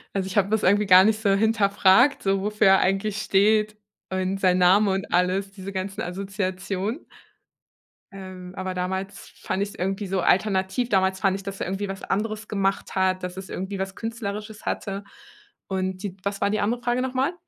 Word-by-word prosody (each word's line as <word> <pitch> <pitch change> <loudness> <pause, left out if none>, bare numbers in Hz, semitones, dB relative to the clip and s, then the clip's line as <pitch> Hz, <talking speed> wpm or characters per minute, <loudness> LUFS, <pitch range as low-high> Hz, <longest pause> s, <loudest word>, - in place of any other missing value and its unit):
Also, 190 -1 -1
ich 190 - -5
habe 200 -1 +3
das 220 0 +1
irgendwie 205 +2 +3
gar 185 -1 +8
nicht 215 +1 +2
so 205 -3 +2
hinterfragt, 205 +4 +4
so 195 0 +1
wofür 210 +1 +2
er 190 0 +6
eigentlich 195 +2 0
steht 210 +1 +2 0.4
und 190 +1 -1
sein 185 -1 +3
Name 195 +3 +5
und 195 +1 -3
alles, 185 +2 +1
diese 195 0 -8
ganzen 195 +2 -4
Assoziationen. 190 - -3 1.1
Ähm, 185 -2 -9
aber 185 -1 -4
damals 190 +1 -4
fand 195 - -1
ich's 200 - -6
irgendwie 195 +3 -2
so 190 0 -1
alternativ. 190 +5 +1
Damals 190 -2 +2
fand 195 -1 +2
ich, 195 - -5
dass 195 -1 -6
er - - -2
irgendwie 195 +2 -3
was 195 0 -6
anderes 215 +2 -2
gemacht 195 -1 -1
hat, 185 -1 +1
dass 180 0 -5
es 190 0 -8
irgendwie 190 +1 -5
was 190 0 -4
Künstlerisches 220 -2 -6
hatte. 200 0 -3 0.6
Und 190 0 -3
die 195 -3 -4
was 200 0 -3
war - - +2
die 215 - 0
andere 235 +4 0
Frage 245 +1 0
nochmal? 260 +5 0
195 Hz, 185 wpm, -24 LUFS, 190-210 Hz, 1.1 s, gar